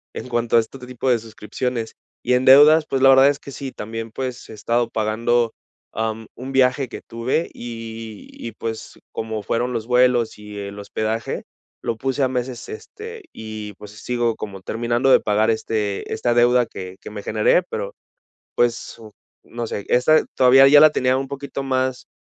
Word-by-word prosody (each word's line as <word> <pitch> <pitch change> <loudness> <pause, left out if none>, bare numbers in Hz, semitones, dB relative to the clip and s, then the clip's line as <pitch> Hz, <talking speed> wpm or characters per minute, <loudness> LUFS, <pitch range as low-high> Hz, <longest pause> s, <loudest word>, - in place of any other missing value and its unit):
en - - -6
cuanto 120 -1 0
a - - +8
este 135 +4 -11
tipo 125 +1 -4
de 120 - +3
suscripciones. 115 +1 -4 0.3
Y 125 - +1
en 125 +1 +2
deudas, 150 +4 +8
pues, 135 - 0
la 135 - +7
verdad 135 +1 +7
es 145 - -1
que 140 - -10
sí 135 -1 -6
también, 115 +1 -6
pues, 130 0 -5
he - - -9
estado 115 +2 0
pagando, 115 +2 +1 0.4
am, 110 0 -3
un 130 +2 -7
viaje 130 0 +3
que - - -8
tuve 120 +8 -2
y 115 -2 -8
y, 115 -2 -8
pues, 115 0 -6
como 110 -2 -4
fueron 120 +3 -1
los 115 -2 -3
vuelos 125 -3 +2
y 105 0 -10
el 100 0 -7
hospedaje, 110 +2 -3 0.4
lo 115 - -2
puse 135 +3 -1
a - - +4
meses, 125 -1 -4
este, 435 0 -9
y, 110 -1 -7
pues, 105 +1 -12
sigo 120 +2 -1
como 100 -2 -7
terminando 120 +5 0
de - - +7
pagar 105 +1 +2
este, 110 -2 -2
esta 120 - 0
deuda 120 0 +4
que 95 0 -8
que - - -9
me 105 -1 -7
generé 110 +11 +2
pero, - - -4 0.6
pues, 120 -1 0 0.5
no 120 0 -5
sé 100 -2 -5
esta 125 +6 +4
todavía 135 +1 +7
ya 145 +1 +8
la 155 - +8
tenía 130 -3 +1
un 135 0 -4
poquito 140 0 -5
más 130 -1 -1
120 Hz, 180 wpm, -21 LUFS, 110-130 Hz, 0.6 s, a